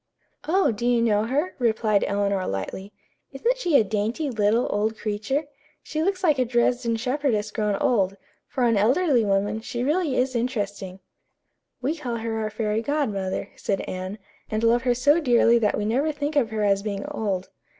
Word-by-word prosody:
"Oh, 345 -4 +3
do 215 +1 -6
you 245 -1 +3
know 215 -2 +2
her?" 290 +9 -1
replied 220 -3 +2
Eleanor 200 -2 0
lightly. 145 - -5 0.4
"Isn't - - 0
she 345 - +3
a - - +4
dainty, 220 +8 -2
little, 220 +1 +2
old 215 +2 0
creature? 220 +7 -2 0.4
She 310 - -3
looks 375 +2 -1
like 305 -6 +3
a - - +4
Dresden 240 0 +1
shepherdess 245 -3 -1
grown 210 -2 0
old. 195 -3 +1 0.3
For 260 - -2
an 230 -3 +3
elderly 255 - +3
woman, 205 +2 0
she 240 +1 -4
really 300 0 +1
is 255 0 0
interesting." 205 -6 -3 0.8
"We 290 +5 0
call 250 -7 -4
her 225 -1 -3
our 215 -1 -2
fairy 215 0 -1
godmother," 220 -9 -2
said 195 - -2
Anne, 185 +2 -5 0.3
"and 215 +1 -2
love 235 +1 +4
her 245 0 +1
so 290 +6 +4
dearly 235 -4 +4
that 210 -2 +1
we 210 - -1
never 270 +8 +1
think 295 +1 -3
of 260 -6 +2
her 215 -1 -2
as 200 -1 +2
being 200 -1 -4
old." 195 -4 -3
230 Hz, 180 wpm, -24 LUFS, 205-265 Hz, 0.8 s, a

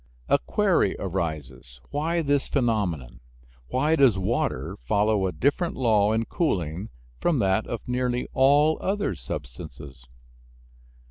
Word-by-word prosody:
A - - +4
query - - +1
arises, 75 -10 -5
Why 165 +4 0
this 145 -1 +1
phenomenon? 100 - -1 0.5
Why 150 - +1
does 135 -9 +4
water 95 - -1
follow 100 - +1
a - - -2
different 145 - 0
law 110 -5 +3
in 115 +1 0
cooling 95 - -2 0.3
from 170 -4 +1
that 100 -1 +1
of 120 - -5
nearly 125 0 -1
all 145 +4 +4
other 200 - -1
substances? 65 -2 -8
110 Hz, 120 wpm, -25 LUFS, -, 0.5 s, A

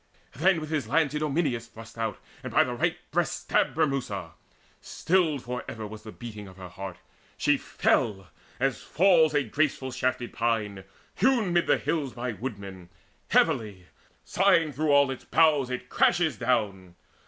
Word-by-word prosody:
Then 170 +5 +3
with 155 0 -7
his 150 -7 -1
lance 150 +3 +2
Idomeneus 145 -6 -1
thrust 115 0 -13
out, 115 -2 -3 0.2
And - - -6
by - - +5
the - - -4
right - - 0
breast - - 0
stabbed - - +1
Bremusa. 130 - -1 0.5
Stilled 160 -6 0
For 125 0 -4
ever 110 -1 -6
was 110 +1 -9
the 110 - -10
beating 105 -4 -9
of 95 0 -14
her 95 -1 -9
heart. 95 0 -7 0.4
She - - +3
fell, 95 -4 0 0.3
as 135 0 0
falls 165 -4 +3
a 145 - +3
graceful 135 +1 -1
shafted 125 -1 -2
pine 105 -5 -1 0.3
Hewn 235 -9 +3
mid 175 0 +2
the - - +4
hills 145 -6 -2
by 125 0 -3
woodmen: 100 -5 -7 0.4
heavily, 100 -5 +1 0.4
Sighing 170 -6 +3
through 155 +3 -1
all 140 -1 +5
its 130 - -7
boughs, 150 -5 +3
it 125 -1 -5
crashes 170 -3 +2
down. 100 -7 -1
125 Hz, 160 wpm, -27 LUFS, 105-155 Hz, 0.5 s, by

